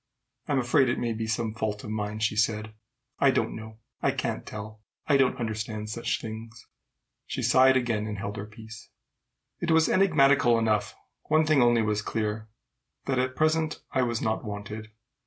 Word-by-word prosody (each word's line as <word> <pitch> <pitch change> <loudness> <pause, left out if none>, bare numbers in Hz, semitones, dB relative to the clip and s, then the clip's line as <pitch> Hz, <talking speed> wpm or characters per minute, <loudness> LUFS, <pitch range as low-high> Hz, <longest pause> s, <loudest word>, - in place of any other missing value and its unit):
"I'm 145 - +1
afraid 130 +1 +3
it - - 0
may 115 -1 -1
be 110 0 -3
some 110 0 -1
fault 110 -2 -3
of 105 - -6
mine," 105 0 -3
she 110 0 0
said. 110 -1 0 0.5
"I 140 - +5
don't - - 0
know. 110 0 -9 0.2
I - - +2
can't - - -3
tell. 110 0 -8 0.2
I 145 - +3
don't 135 -1 +3
understand 110 -2 -4
such 115 +1 -2
things." 110 0 -8 0.6
She - - -3
sighed 130 0 +5
again, 115 -4 -1
and 105 -1 -4
held 100 +1 -4
her 100 +1 -5
peace. 110 0 -12 0.7
It 170 - -2
was 160 -1 +5
enigmatical 140 -10 +4
enough. 110 -2 0 0.3
One 155 +1 +3
thing 155 -3 +4
only 120 -2 +4
was 105 -1 0
clear, 110 0 -3 0.6
that 130 -2 0
at 130 0 -1
present 155 +1 +1
I 130 - +1
was 120 -2 -1
not 110 +2 -1
wanted. 105 +1 -6
110 Hz, 175 wpm, -27 LUFS, 110-130 Hz, 0.7 s, I